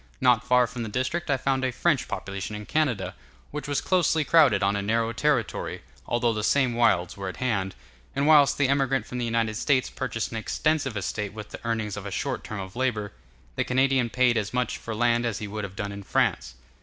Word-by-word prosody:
Not 125 -2 +4
far 125 0 +4
from 120 +1 -6
that 110 -2 -5
district 165 +7 -1
I 135 - +3
found 130 0 0
a 130 - +1
French 155 +1 +1
population 100 +2 -5
in 105 0 -7
Canada, 115 -13 0 0.4
which 150 0 -5
was 145 -1 0
closely 170 -4 +2
crowded 140 -11 +5
on 100 +1 +2
a 100 - -1
narrow 115 +3 0
territory, 125 - -1 0.2
although 120 -1 +1
the 105 -1 -3
same 130 +1 +2
wilds 95 -7 +2
were 100 -2 -4
at - - -8
hand; 100 -7 -1 0.4
and 140 +1 +1
whilst 150 -2 +6
the 145 - +3
emigrant 135 -3 +1
from 125 - -5
the 120 - -1
United 115 -2 0
States 130 +1 +1
purchased 115 -4 -3
an 115 - -4
extensive 135 +1 0
estate 105 +1 -3
with 105 -1 -8
the - - -10
earnings 110 -3 -2
of 100 0 -6
a - - -3
short - - -3
term 110 - -6
of 95 +1 -7
labor, 115 -5 -1 0.4
the - - +1
Canadian 130 -1 +2
paid 125 -1 +3
as 105 +2 -2
much 125 0 -1
for 115 - -5
land 120 +1 +2
as 115 -4 -1
he 105 - -5
would 105 +1 -5
have 100 -1 -6
done 100 0 -4
in 100 0 -7
France. 95 - 0
120 Hz, 220 wpm, -26 LUFS, 105-130 Hz, 0.4 s, whilst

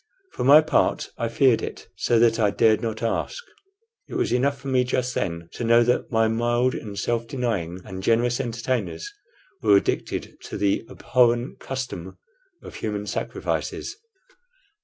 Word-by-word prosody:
For - - -3
my 145 +4 +8
part, 155 - +1
I 115 - 0
feared 115 +1 +3
it - - -7
so 115 +5 +1
that 115 0 +4
I 105 -2 +4
dared 110 +1 +3
not 110 -1 -3
ask. 115 - -2 0.7
It - - -7
was - - 0
enough 135 +3 +1
for 135 - -9
me 130 -1 +3
just 125 0 -1
then 85 -4 -3
to - - -5
know 115 +1 +5
that 125 +1 0
my 110 -1 +3
mild 120 +3 +1
and 100 -2 -6
self 115 +2 -1
denying 105 -10 -2
and 95 0 -7
generous 120 +4 +2
entertainers 125 - -3 0.5
were 100 - +6
addicted - - -2
to - - -6
the 100 +2 0
abhorrent 120 0 +1
custom 125 -9 -6 0.5
of - - -10
human 105 -1 -3
sacrifices. - - -3
115 Hz, 160 wpm, -24 LUFS, 110-125 Hz, 0.7 s, my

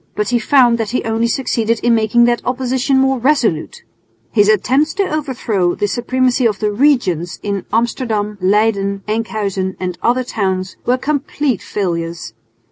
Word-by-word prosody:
But 210 -1 -1
he 240 -1 +2
found 240 -1 +4
that 220 -2 -2
he 250 - -1
only 225 +1 0
succeeded 230 -2 0
in 240 - +3
making 225 +1 +3
that 240 0 +2
opposition 260 +1 0
more 265 -1 +2
resolute. 240 - 0 0.5
His 205 -2 +3
attempts 260 +9 +2
to 400 - +1
overthrow 235 - -1
the 205 - -1
supremacy 250 +2 +1
of 210 -3 -2
the 210 +1 -1
"regents" 205 - +1
in 200 -2 -3
Amsterdam, 220 -3 -1
Leyden, 200 0 +1
Enkhuizen 210 -4 -2
and 180 -1 -4
other 250 +2 +1
towns 190 -6 -2
were 250 +1 +3
complete 280 -3 -1
failures. 170 - -4
225 Hz, 150 wpm, -17 LUFS, 200-255 Hz, 0.5 s, found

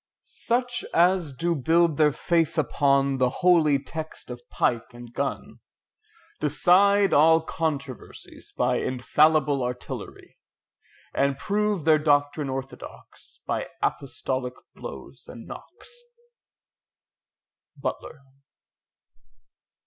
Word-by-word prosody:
Such 245 0 -2
as 175 -2 +3
do 170 +6 -1
build 165 +2 +2
their 150 -1 +4
faith 165 +2 0
upon 140 -2 +2
The 130 -1 +3 0.2
holy 160 -5 +5
text 155 0 -7
of 120 0 -8
pike 120 0 -1
and 120 0 -12
gun, 140 +2 -4 0.8
Decide 185 +8 +4
all 160 +3 +6
controversies 145 -6 -6
by - - +1
Infallible 145 +2 +2
artillery, 125 0 -7 0.7
And 140 0 +1
prove 205 -2 -1
their 155 -1 +5
doctrine 145 -1 +1
orthodox, 135 0 -9
By - - -2 0.2
apostolic 130 -2 -3 0.2
blows - - -10
and - - -11
knocks. 485 0 -11 1.8
BUTLER. 145 - -5
150 Hz, 95 wpm, -25 LUFS, 135-170 Hz, 1.8 s, all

